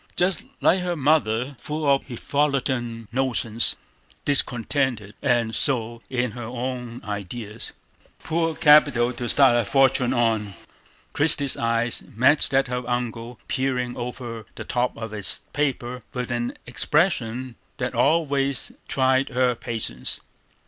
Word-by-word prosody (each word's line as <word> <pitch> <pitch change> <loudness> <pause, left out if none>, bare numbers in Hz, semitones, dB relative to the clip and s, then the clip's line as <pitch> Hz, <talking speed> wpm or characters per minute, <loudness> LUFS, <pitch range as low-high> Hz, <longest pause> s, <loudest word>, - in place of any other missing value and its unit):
"Jest 180 +1 +3 0.2
like 185 - +4
her 175 -1 -1
mother, 135 -4 +1
full 150 0 -3
of 140 -1 +3
hifalutin 130 -3 -1
notions, 120 -3 0 0.5
discontented, 125 -5 +1
and 120 -4 +1
sot 120 -3 -1
in 125 -2 -1
her 120 - -8
own 125 0 -5
idees. 105 +2 -6 0.5
Poor 165 0 -1
capital 145 -6 +5
to 120 -1 -4
start 135 -4 +6
a 120 - +3
fortin' 130 +1 +3
on." 110 -5 0 0.6
Christie's 145 -2 +4
eye 115 +1 0 0.2
met 140 +6 +4
that 135 -1 +2
of 125 0 -3
her - - -7
uncle 120 -1 -3
peering 125 -2 -1
over 120 -2 -6
the - - -7
top 125 0 -1
of 110 -1 -6
his 105 -4 0
paper 125 -4 -2
with 125 0 -3
an 120 0 -2
expression 130 -3 0 0.2
that - - -2
always 140 -3 +1 0.2
tried 130 0 +2
her 125 0 +2
patience. 115 - -3
125 Hz, 130 wpm, -24 LUFS, 115-140 Hz, 0.6 s, start